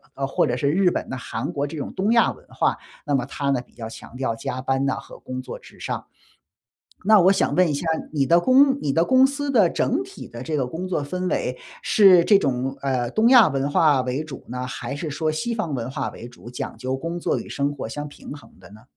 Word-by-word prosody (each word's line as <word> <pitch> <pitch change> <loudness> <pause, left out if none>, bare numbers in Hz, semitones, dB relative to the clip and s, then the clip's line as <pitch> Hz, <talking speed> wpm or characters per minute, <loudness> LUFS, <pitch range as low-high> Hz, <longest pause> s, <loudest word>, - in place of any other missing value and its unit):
呃， 135 0 -2
或 - - +1
者 120 - -1
是 140 +2 +1
日 180 +2 +3
本 - - -3
呐 130 - -4
韩 125 +5 -4
国 145 -1 -1
这 155 - -7
种 140 - -5
东 200 +4 0
亚 235 -1 +4
文 - - -19
化， - - 0 0.3
那 145 -1 +1
么 125 -2 0
它 140 +1 -3
呢 130 -3 +1
比 - - -29
较 110 -1 -7
强 115 - -12
调 125 -4 -1
加 125 +2 -4
班 135 +1 0
呐 135 - +1
和 - - -11
工 130 0 -6
作 - - -8
至 - - -17
上。 - - -4 1.0
那 215 -1 +7
我 190 +2 +5
想 - - +1
问 180 -1 +4
一 - - 0
下， 145 - -3 0.3
你 140 -3 +2
的 170 +3 +5
公 270 +5 +4
你 140 -2 0
的 165 - +3
公 260 +5 +5
司 285 0 -3
的 205 -9 +4
整 305 +10 0
体 390 +1 -11
的 120 0 -9
这 155 +3 -3
个 135 -3 0
工 175 +7 -5
作 160 -6 -1
氛 180 +5 -3
围 - - -1 0.2
是 190 -6 +6
这 200 +1 +6
种， 135 -3 -1
呃， 130 -3 -1
东 225 +2 +3
亚 245 -8 +7
文 135 0 -1
化 145 -2 +4
为 130 +4 -2
主 150 -4 -10
呢， 125 +1 -4
还 135 +2 -5
是 155 +1 -4
说 155 +2 -1
西 235 +10 -2
方 170 -11 -2
文 120 +1 -4
化 135 -1 -3
为 120 - -10
主， 120 -1 -13
讲 125 -2 -6
究 130 +2 -2
工 165 +5 -4
作 - - 0
与 - - -7
生 140 +1 -1
活 115 - -6
相 145 +4 -5
平 145 - -12
衡 145 - -14
的 90 0 -16
呢？ 110 +2 -15
145 Hz, 270 characters per minute, -23 LUFS, 130-185 Hz, 1.0 s, 那